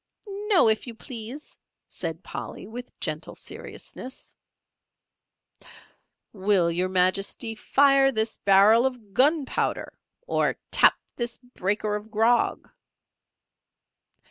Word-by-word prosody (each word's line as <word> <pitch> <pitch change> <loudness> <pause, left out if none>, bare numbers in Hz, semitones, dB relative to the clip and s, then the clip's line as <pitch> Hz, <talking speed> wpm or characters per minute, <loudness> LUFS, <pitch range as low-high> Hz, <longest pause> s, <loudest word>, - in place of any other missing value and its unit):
"No, 380 - +5
if 220 +3 +2
you 235 - -7
please," 245 +4 -7 0.3
said 165 0 -6
Polly, - - -7
with 245 +4 -10
gentle - - -4
seriousness. 260 +2 -8 2.0
"Will 190 -4 +2
Your 180 +2 0
Majesty 190 +5 +1
fire 275 +4 +4
this 220 -2 -1
barrel 205 +5 +5
of 235 -6 -8
Gunpowder, 285 +2 +1 0.3
or - - +1 0.2
tap - - +6 0.2
this 240 -1 -3
breaker 210 -4 -2
of 210 +1 -6
Grog?" 225 +2 +2
225 Hz, 95 wpm, -25 LUFS, 200-255 Hz, 2.0 s, tap